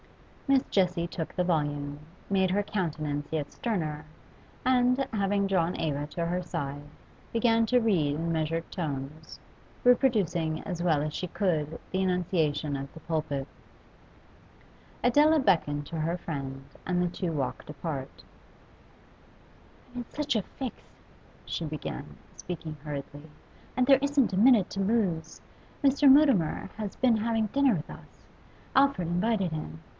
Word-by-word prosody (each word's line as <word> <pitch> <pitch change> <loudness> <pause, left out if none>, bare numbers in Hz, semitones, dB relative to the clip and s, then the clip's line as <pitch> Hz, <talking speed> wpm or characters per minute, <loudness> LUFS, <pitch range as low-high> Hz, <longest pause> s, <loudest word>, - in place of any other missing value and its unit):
Miss 275 -1 +4
Jessie 180 -3 +1
took 165 -2 -5
the 180 - 0
volume, 145 -4 -1 0.3
made 190 -1 +3
her 205 +2 +2
countenance 155 -7 -2
yet 150 -3 -2
sterner, 160 -10 -2 0.6
and, 250 0 +4 0.2
having 200 -1 +1
drawn 180 -3 +1
Eva 145 -2 -1
to 170 +2 -3
her 175 +2 -1
side, 145 -5 -4 0.5
began 230 0 +3
to 250 +3 +4
read 175 -11 +2
in 165 +2 -1
measured 165 +1 -1
tones, 150 -2 -5 0.4
reproducing 205 - +3
as 175 -4 -4
well 155 -4 +2
as 155 0 -3
she 180 - -3
could 160 -5 -1
the 185 - 0
enunciation 165 -5 0
of 140 0 -5
the - - -10
pulpit. 150 -4 -2 1.6
Adela 300 +6 +5
beckoned 160 - +2
to 165 +2 -5
her 165 +3 0
friend, 135 -5 -5 0.2
and 180 -1 +1
the 180 - +2
two 175 0 -3
walked 145 -2 -3
apart. 145 -3 -5 1.7
'I'm 245 - -5
in - - -8
such 295 -3 -1
a 215 - +3
fix,' 255 +5 -7 0.6
she - - -3
began, 150 -2 -6 0.2
speaking 165 -3 -6
hurriedly, 145 +1 -7 0.5
'and 255 0 +3
there 270 -1 +7
isn't 280 -6 +2
a - - 0
minute 225 -3 +6
to 195 - -2
lose. 190 -7 0 0.4
Mr. 280 0 +6
Mutimer 265 - +4
has 210 -3 -5
been 245 -3 +4
having 225 0 +1
dinner 275 0 +3
with 155 - -5
us; - - -13 0.5
Alfred 270 -11 +4
invited 185 +1 +1
him. 80 - -5
175 Hz, 140 wpm, -28 LUFS, 155-220 Hz, 1.7 s, there